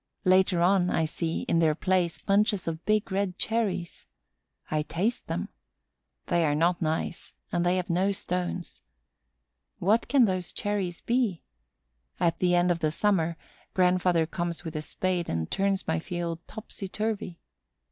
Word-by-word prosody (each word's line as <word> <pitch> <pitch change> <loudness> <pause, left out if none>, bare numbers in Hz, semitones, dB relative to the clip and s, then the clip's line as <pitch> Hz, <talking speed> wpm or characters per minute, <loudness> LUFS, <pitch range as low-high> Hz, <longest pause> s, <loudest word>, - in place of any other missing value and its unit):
Later 185 -1 +4
on, 180 0 +4
I 160 - +1
see, 165 +1 -2
in 165 - +1
their 155 -2 +3
place, 180 -1 +1
bunches 205 -1 +2
of 165 0 -3
big 215 0 +2
red 190 -1 -1
cherries. 210 -7 -2 0.6
I 155 0 +2
taste 195 +10 -2
them. - - -3 0.8
They 175 -1 +2
are 145 -2 +2
not 170 +3 +2
nice 160 +1 -2 0.2
and 175 - +1
they 175 +1 +2
have 180 - -2
no 185 +3 +2
stones. 180 -2 -4 1.0
What 210 +6 +2
can 270 -4 +5
those 185 -3 -2
cherries 195 -4 -2
be? 235 -8 0 0.8
At 170 -1 +1
the 180 -1 +3
end 175 0 +3
of 170 - 0
the 155 -2 +1
summer, 170 -1 +1 0.4
grandfather 180 -2 +3
comes 170 +1 -3
with 160 -2 -6
a 155 - -1
spade 180 +2 -1
and 80 -1 -2
turns 195 0 0
my 160 0 +1
field 170 -1 -4
topsy 215 -2 -7
turvy. 210 -3 -3
180 Hz, 155 wpm, -28 LUFS, 170-195 Hz, 1.0 s, can